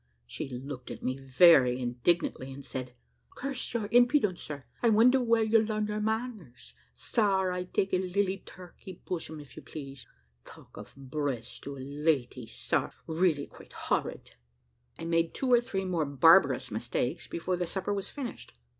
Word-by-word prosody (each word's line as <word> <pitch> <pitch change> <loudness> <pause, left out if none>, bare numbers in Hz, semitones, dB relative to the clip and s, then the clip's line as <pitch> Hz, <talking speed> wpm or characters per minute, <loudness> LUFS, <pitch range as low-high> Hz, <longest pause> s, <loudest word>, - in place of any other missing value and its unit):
She - - -6
looked 130 +1 -7
at - - -8
me 130 - -1
very 135 -1 +5
indignantly, 130 +2 0
and 135 0 -9
said, 125 -1 -6 0.4
"Curse 275 -1 -4
your 220 -3 -1
impudence, 245 - +4
sir, 145 -2 -7 0.2
I 235 - +4
wonder 245 +5 +5
where 230 -2 +3
you 220 0 +4
larn 215 -1 -1 0.2
manners. 215 - -4 0.2
Sar, 190 - +1
I 180 0 -3
take 190 +1 -1
a 185 - +4
lily 190 +1 -1
turkey 180 0 -12
bosom, 160 -3 -4
if 145 -2 -13
you - - -9
please. 135 -5 -9 0.4
Talk - - -15
of - - -11
breast 135 -3 -4
to 140 - -5
a - - -11
lady, 135 -3 -1
sar! - - -1
really 160 -3 +1
quite - - -16
horrid." - - -2 0.7
I - - -7
made 165 0 +1
two 255 -2 +1
or 240 - +6
three 195 -5 -3
more 175 -4 0
barbarous 140 -2 +5
mistakes 120 +6 -2
before 180 +2 -2
the 175 -1 -2
supper 190 +3 -2
was 200 -1 -3
finished. 260 - -7
165 Hz, 165 wpm, -29 LUFS, 135-205 Hz, 0.7 s, or